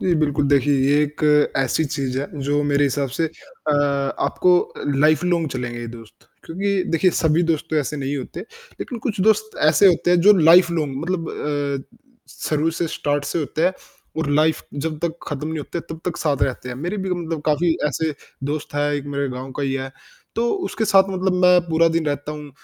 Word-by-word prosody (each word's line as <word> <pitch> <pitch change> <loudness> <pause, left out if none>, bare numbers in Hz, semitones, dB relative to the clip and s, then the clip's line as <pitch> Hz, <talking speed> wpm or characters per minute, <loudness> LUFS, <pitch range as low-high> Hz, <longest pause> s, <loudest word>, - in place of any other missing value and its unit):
जी, 180 - +2
बिल्कुल 145 -1 +1
देखिए 145 0 +3
ये 145 +1 +4
एक 150 +1 -4 0.3
ऐसी 135 +4 +1
चीज़ 135 -3 -2
है 140 - -3 0.2
जो 145 0 +2
मेरे 145 0 +3
हिसाब 140 0 0
से 165 - +2
अ, 260 - -5 0.5
आपको 180 -1 +3
अ, - - -7 0.2
लाइफ़ 155 +3 +3
लॉन्ग 170 -3 +1
चलेंगे 120 -2 -4
ये 120 - -5
दोस्त। 115 -2 -15 0.2
क्योंकि 195 +3 -1
देखिए 180 +2 +3
सभी 160 +1 +2
दोस्त 155 -2 -1
तो 160 - 0
ऐसे 150 0 -1
नहीं 140 +1 -2
होते 135 +5 -6 0.4
लेकिन 245 - -5
कुछ 215 -4 -2
दोस्त 220 +2 +2
ऐसे 155 +6 +5
होते 175 -1 +3
हैं, 180 - +4
जो 205 +4 +7
लाइफ़ 170 +2 +6
लॉन्ग 150 -5 -2
मतलब 170 -1 -2
अ, 145 - -3 0.5
शुरू 155 +1 +1
से, 170 +1 -2
स्टार्ट 145 -1 -1
से - - -2
होते 155 +1 -1
हैं, 185 - +3 0.5
और 160 - -1
लाइफ़ 155 +2 +2 0.2
जब 155 -1 -3
तक 165 -1 -2
खत्म 145 0 -4
नहीं 160 0 -3
होते 160 +3 -5
तब 160 - -13
तक 180 - -2
साथ 145 -4 0
रहते 125 -1 -1
हैं। 125 - -4
मेरे 175 +9 -3
भी 190 - -3
मतलब 165 -3 -3
काफ़ी 160 +2 +2
ऐसे 155 +2 -2 0.4
दोस्त 150 -1 -5
हैं, 145 0 +1
एक 145 -1 -2
मेरे 140 0 -1
गाँव 130 +1 -6
का 145 - -4
ही 135 -1 0
है, 135 0 -4 0.4
तो 230 - +1 0.2
उसके 220 - -2
साथ 195 -2 +5
मतलब 190 0 0
मैं 180 0 +6
पूरा 165 +1 +4
दिन 165 -1 -1
रहता 145 +1 -2
हूँ। 150 -1 -9
155 Hz, 210 wpm, -21 LUFS, 145-175 Hz, 0.5 s, जो